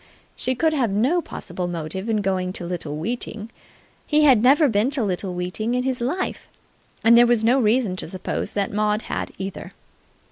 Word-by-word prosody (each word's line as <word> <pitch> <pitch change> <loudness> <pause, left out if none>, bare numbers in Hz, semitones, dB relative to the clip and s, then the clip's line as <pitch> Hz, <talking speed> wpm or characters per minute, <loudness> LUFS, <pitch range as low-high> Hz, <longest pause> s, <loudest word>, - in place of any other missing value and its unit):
She 255 - -1
could 315 +5 +1
have 260 -7 +1
no 250 - +1
possible 180 - -5
motive 175 +4 -4
in 215 -2 0
going 185 -1 -1
to 175 - -7
Little 165 -4 -4
Weeting. 225 +3 -5 0.6
He 305 0 +3
had 260 -7 +6
never 280 +5 +5
been 220 +1 +2
to 270 -4 -1
Little 185 -2 -3
Weeting 185 +7 -2
in 250 - 0
his 260 -2 -2
life, 325 +10 -3 0.5
and 230 +1 +7
there 240 0 +7
was 235 -2 +3
no 250 +4 +4
reason 220 -4 +2
to - - -5
suppose 185 +2 -3
that 200 -1 -1
Maud 210 +1 0
had - - -4
either. 195 0 -6
220 Hz, 185 wpm, -22 LUFS, 190-250 Hz, 0.6 s, and